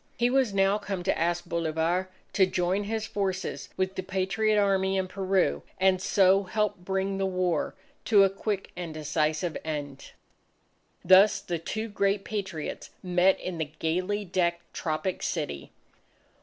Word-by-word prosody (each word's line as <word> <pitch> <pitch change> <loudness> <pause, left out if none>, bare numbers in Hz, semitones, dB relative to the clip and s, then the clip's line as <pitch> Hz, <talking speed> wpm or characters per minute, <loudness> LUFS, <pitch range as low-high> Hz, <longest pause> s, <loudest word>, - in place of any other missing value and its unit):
He 240 +1 +2
was 260 -4 +3
now 195 +1 +2
come 195 -4 -4
to 190 - +1
ask 175 +1 0
Bolivar 170 +2 -1 0.2
to 190 -3 +4
join 185 +3 0
his 220 +1 -2
forces 195 -3 -3
with 185 0 0
the 185 - -3
Patriot 190 +3 +1
Army 195 -1 +2
in 190 -1 0
Peru 185 - 0 0.2
and 185 -1 +3
so 190 0 +4
help 205 +1 -1
bring 195 +1 -2
the 195 - +1
war 180 -4 -1 0.3
to 205 -4 +6
a 195 - +4
quick, 195 0 -3
decisive 155 -1 -1
end. 145 -3 -5 0.9
Thus 195 +3 +7
the 170 -3 -4
two 215 +7 -4
great 200 -1 0
Patriots 190 -7 -4
met 180 +1 +3
in 180 -2 -5
the 155 -2 -2
gayly 185 +6 -1
decked 175 -1 -1
tropic 170 +3 -2
city. 145 - -3
190 Hz, 145 wpm, -28 LUFS, 170-195 Hz, 0.9 s, Thus